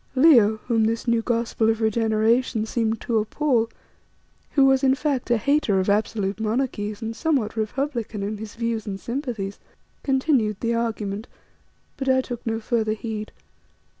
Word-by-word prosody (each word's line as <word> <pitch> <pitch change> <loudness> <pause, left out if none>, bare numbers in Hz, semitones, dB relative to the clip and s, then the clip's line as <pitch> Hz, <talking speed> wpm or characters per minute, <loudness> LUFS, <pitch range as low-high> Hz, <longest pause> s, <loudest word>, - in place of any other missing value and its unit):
Leo, 250 -7 +6
whom 225 -3 +2
this 230 +2 -1
new 235 -1 +3
gospel 230 -1 0
of 225 0 +1
regeneration 220 +1 +2
seemed 225 -1 -1
to 230 -2 +1
appall, 230 +1 +1 0.8
who 275 -2 +5
was, 270 0 +4
in 265 0 +4
fact, 275 -2 -1
a 240 - +4
hater 255 -5 +2
of 190 +2 +1
absolute 205 -1 0
monarchies 215 -2 -2
and 225 0 -4
somewhat 270 -10 0
republican 230 -1 -2
in 210 +2 -3
his 210 0 -8
views 230 -2 -2
and 195 -1 -4
sympathies, 235 -6 -4 0.4
continued 260 -7 +1
the 235 0 0
argument, 220 -2 -2 0.7
but 270 -1 -2
I 260 0 +4
took 245 -2 -7
no 225 0 0
further 220 -1 0
heed. 215 -1 -5
225 Hz, 155 wpm, -24 LUFS, 215-255 Hz, 0.8 s, Leo